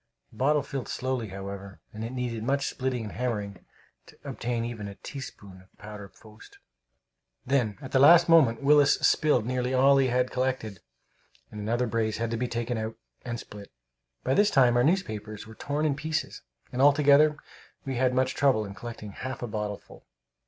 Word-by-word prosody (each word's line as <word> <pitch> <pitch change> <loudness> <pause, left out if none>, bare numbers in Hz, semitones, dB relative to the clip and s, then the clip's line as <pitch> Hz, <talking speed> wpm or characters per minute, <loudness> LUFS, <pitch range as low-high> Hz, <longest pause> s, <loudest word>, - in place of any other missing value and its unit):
The - - -18
bottle 145 +3 +2
filled 135 -3 -5
slowly, 130 -3 -3
however, 100 0 -8
and 110 +1 -6
it 115 - -4
needed 125 -3 -3
much 140 +3 0
splitting 130 -3 -2
and 105 - -6
hammering 105 -6 -4 0.4
to - - -17
obtain 120 -1 -3
even 115 -3 -6
a 100 - -8
teaspoonful 100 -8 -10
of 95 - -26
powder 105 -1 -10
post. 110 +2 -17 0.9
Then, 125 -6 0
at 135 - -8
the 135 - +3
last 165 +5 +7
moment, 140 -8 +4
Willis 145 0 +5
spilled 150 -7 +2
nearly 125 +1 -1
all 135 +2 +5
that - - +5
he 130 - +2
had 125 +1 +1
collected, 125 -6 -2 0.7
and 105 - -7
another 120 +4 0
brace 110 -2 -1
had 115 0 -2
to 115 - -1
be 125 +2 -1
taken 120 0 -3
out 110 0 -4 0.3
and 120 -1 -4
split. 100 -3 -11 0.5
By 130 - +1
this 205 +7 +4
time 125 - +4
our 120 - +4
newspapers 110 - -1
were 110 - -12
torn 145 +6 -2
in 150 - +2
pieces, 155 +3 -3 0.3
and 125 - -2
altogether 145 +1 +5 0.5
we 135 -2 -3
had 125 0 +1
much 130 0 +1
trouble 130 -7 +2
in 100 - -8
collecting 110 -1 -8
half 130 +4 -6
a - - -2
bottleful. 105 -1 -6
125 Hz, 185 wpm, -27 LUFS, 110-135 Hz, 0.9 s, last